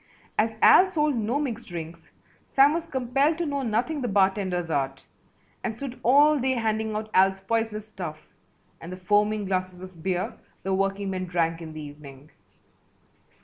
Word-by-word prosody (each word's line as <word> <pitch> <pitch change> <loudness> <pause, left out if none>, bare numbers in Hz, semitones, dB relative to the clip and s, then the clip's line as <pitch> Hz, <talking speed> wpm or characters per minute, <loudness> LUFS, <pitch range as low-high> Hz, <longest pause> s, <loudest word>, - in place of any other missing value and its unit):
As 220 0 0
Al 375 - +8
sold 300 -6 0
no 230 +3 0
mixed 235 -6 -4
drinks 165 -1 -8 0.4
Sam 275 +2 +5
was 335 0 -3
compelled 275 +2 +1
to 345 - -1
know 285 -2 -2
nothing 255 +6 -1
the 245 - -1
bartender's 190 -4 +1
art 135 -2 -2 0.6
and 225 -2 -2
stood 260 +1 -7
all 290 +4 +5
day 260 +1 +1
handing 220 -2 -1
out 215 0 -4
Al's 190 +1 +4
poisonous 220 0 -2
stuff 160 -7 -7 0.6
and 165 - -8
the 185 - -6
foaming 210 +2 +1
glasses 185 -1 -3
of 185 -3 -11
beer 180 +1 -1 0.3
the 190 - -1
workingmen 195 -1 -1
drank 165 -1 0
in 160 -1 -8
the 155 - -7
evening. 145 -1 -12
210 Hz, 160 wpm, -26 LUFS, 180-250 Hz, 0.6 s, Al